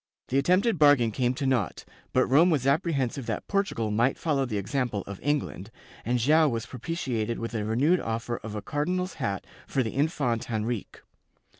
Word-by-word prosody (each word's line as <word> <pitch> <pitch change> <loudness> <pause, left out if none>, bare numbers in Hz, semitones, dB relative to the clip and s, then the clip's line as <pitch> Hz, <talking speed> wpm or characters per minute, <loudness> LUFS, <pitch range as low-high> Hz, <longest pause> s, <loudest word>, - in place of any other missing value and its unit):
^ - - -30
The 135 - +2
attempted 185 - +2
bargain 145 -6 +5
came 125 +3 0
to 140 0 -3
naught, 120 - 0 0.3
but 130 - +3
Rome 155 +8 +5
was 145 -7 +1
apprehensive 140 -4 0
that 110 - -3
Portu 200 0 0
gal 110 -2 -1
might 120 +5 +2
follow 145 -4 0
the 110 -3 -2
example 110 0 -2
of 100 -1 -8
England, 140 -8 -2 0.3
and 125 +1 +1
Joao 150 +6 +4
was 115 -3 -3
propiti 130 -1 -4
ated 115 +2 -1
with 115 +1 -5
a 110 -2 -1
renewed 135 +12 +2
offer 115 +1 -3
of 110 -1 -7
a 105 - -5
cardinal's 180 +7 -1
hat 100 -6 -2 0.2
for 135 - +1
the 110 - -4
Infante 135 -5 0
Henrique. 110 0 -3
125 Hz, 190 wpm, -27 LUFS, 115-150 Hz, 0.3 s, bargain